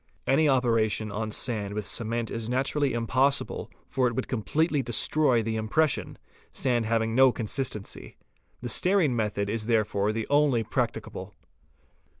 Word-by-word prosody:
Any 150 +3 +3
operation 115 -4 +1
on 110 +2 -3
sand 105 -2 -3
with 105 -1 -3
cement 115 +2 -2
is 115 0 -4
naturally 135 +2 0
impossible 130 +4 0 0.2
for 130 -2 +1
it 120 - -3
would 130 - -2
completely 145 +6 0
destroy 120 +1 +3
the 110 0 -2
impression, 140 +8 0 0.3
sand 120 -3 -1
having 115 0 0
no 130 +1 +6
consistency. 115 -2 -4 0.4
The 120 - -4
stearine 180 - +3
method 105 -3 -1
is 110 +1 -2
therefore 105 -3 +1
the 110 0 -3
only 145 -5 +3
one - - -23
practicable. - - -3
115 Hz, 145 wpm, -27 LUFS, 110-135 Hz, 0.4 s, no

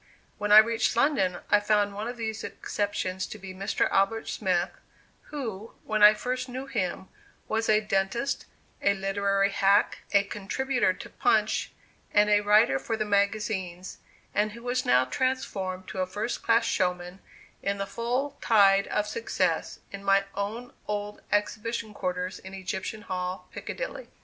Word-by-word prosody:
When 210 0 -1
I 210 - +10
reached 225 +1 +5
London, 235 -9 +2
I 210 - +7
found 205 -1 +2
one 210 +3 -4
of 240 0 -5
these 220 -1 -4
exceptions 190 -2 -3
to - - -8
be 190 -1 -9
Mr. 195 +3 0
Albert 195 +3 +1
Smith, 180 -3 0 0.5
who, 230 -8 -6
when 215 -1 -1
I 210 +1 +9
first 255 +3 -3
knew 260 +2 -5
him, 190 -7 -3 0.4
was 225 +1 -1
a 215 0 +5
dentist, 210 +6 -1 0.4
a 200 0 +3
literary 195 0 +1
hack, 200 +1 +3
a 200 0 +5
contributor 230 +3 0
to - - -8
Punch, - - +1 0.4
and 210 0 +5
a 205 0 +5
writer 205 -10 +4
for 225 - -3
the 215 - -1
magazines, 200 -3 -1 0.3
and 210 0 +1
who 235 +1 -11
was 250 +1 -1
now 125 +1 +5
transformed 190 - -2
to 190 - -5
a 185 - 0
first 210 +5 -3
class 230 0 +3
showman 180 0 -1 0.4
in 200 0 -1
the 200 - -2
full 245 +7 -2
tide 200 -3 +5
of 210 - 0
success, 460 - -1
in 200 0 -8
my 195 0 +4
own 215 +5 -4
old 210 0 -4
exhibition 215 +1 -1
quarters 180 -2 -3
in 190 +1 -10
Egyptian 190 +3 -4
Hall, 180 -2 -4
Piccadilly. - - -6
205 Hz, 155 wpm, -27 LUFS, 195-225 Hz, 0.5 s, I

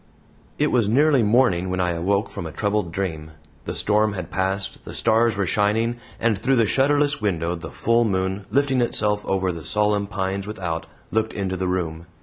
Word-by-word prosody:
It 150 +1 +1
was 115 -5 +2
nearly 140 +3 +4
morning 105 -5 +3
when 90 0 -2
I 90 -1 +1
awoke 100 +5 0
from 85 - -5
a - - -7
troubled 100 +1 -1
dream. 80 -4 -4 0.3
The - - -4
storm 105 0 +2
had 90 -4 -6
passed, 95 +1 -2
the - - -9
stars 115 -1 +2
were 100 - +1
shining, 110 +5 +1 0.2
and 110 -4 +1
through 130 +5 +2
the 115 -2 +4
shutterless 145 +3 +2
window 85 -5 0
the 85 -1 -7
full 115 +1 +2
moon, 95 -1 -1
lifting 135 +2 +2
itself 105 -3 0
over 95 -1 0
the 85 -2 -7
solemn 105 +2 +1
pines 95 0 -3
without, 90 -6 -4 0.2
looked 110 0 0
into 95 -2 -2
the 95 0 -2
room. 85 -2 -3
100 Hz, 185 wpm, -23 LUFS, 95-115 Hz, 0.3 s, nearly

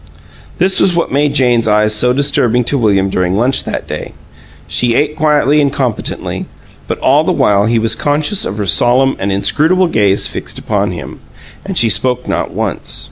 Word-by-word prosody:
This 190 +2 +1
was 180 - +2
what 170 - -1
made 145 +1 0
Jane's 120 -4 +2
eyes 105 0 +2
so 125 +4 +2
disturbing 125 -3 +1
to 140 +4 0
William 100 -4 +2
during 90 -1 -1
lunch 125 +6 0
that - - -4
day. - - -7 0.5
She 120 -1 0
ate 150 +3 0
quietly 150 -1 +2
and 140 -1 +1
competently, 130 -5 -3 0.4
but - - -3
all - - +3
the - - 0
while 100 0 +2
he 115 +1 +1
was 115 0 +2
conscious 150 - -1
of 100 - -4
her 105 - -2
solemn 125 +8 +3
and 100 - -2
inscrutable 160 - +1
gaze 100 - +1
fixed - - -6
upon 100 -2 -1
him; 90 -2 -8 0.4
and 195 -2 -5
she 115 - +4
spoke 125 +4 0
not - - -2
once. - - -3
125 Hz, 185 wpm, -13 LUFS, 105-145 Hz, 0.5 s, she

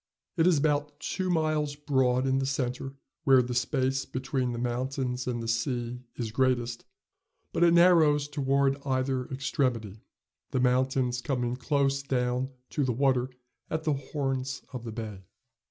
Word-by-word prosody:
It 165 -1 +3
is 175 -4 +5
about 145 0 0
two 185 +4 -2
miles 155 -3 +1
broad 130 -3 +1
in 135 0 +2
the 135 - -1
centre, 135 0 -2 0.3
where 130 -2 +6
the 125 +1 -4
space 130 +2 0
between 130 -1 -2
the 120 - -4
mountains 125 +1 -2
and 120 -2 -2
the - - -4
sea 120 +1 -1 0.2
is 115 -3 -4
greatest, 120 -1 0 0.7
but - - +2
it 170 0 +6
narrows 160 -5 +5
toward 140 -1 +1
either 130 -1 0
extremity, 125 -6 -1 0.5
the 130 - 0
mountains 125 0 +1
coming 125 -3 -1
close 140 +1 +1
clown 125 -1 0 0.2
to 145 - 0
the 130 -2 +1
water 130 0 +2 0.4
at 160 0 -2
the 155 -2 +2
horns 135 -1 -3
of 120 -2 -6
the 115 - -4
bay. 110 -3 -6
130 Hz, 155 wpm, -28 LUFS, 125-140 Hz, 0.7 s, where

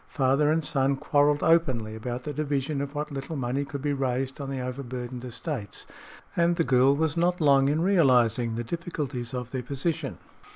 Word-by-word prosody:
Father 140 +2 +2
and 160 -1 +1
son 135 0 +2
quarreled 145 +1 +2
openly 130 -10 +2
about 120 +3 -5
the 150 - -4
division 145 -1 -1
of 140 +1 -5
what 150 +1 -3
little 140 +3 -5
money 130 +1 -1
could 140 0 -6
be 145 -1 +1
raised 135 0 -2
on 140 - -5
the 135 -1 -3
overburdened 125 -1 -5
estates, 125 - -5 0.5
and 170 0 +3
the 170 - +2
girl 130 0 +4
was 155 0 0
not 175 +1 +1
long 140 -3 +4
in 155 +3 +1
realizing 125 - +3
the 120 - -2
difficulties 145 -5 -4
of 125 -1 -5
their 130 - -2
position. 140 +3 -3
135 Hz, 180 wpm, -27 LUFS, 125-150 Hz, 0.5 s, girl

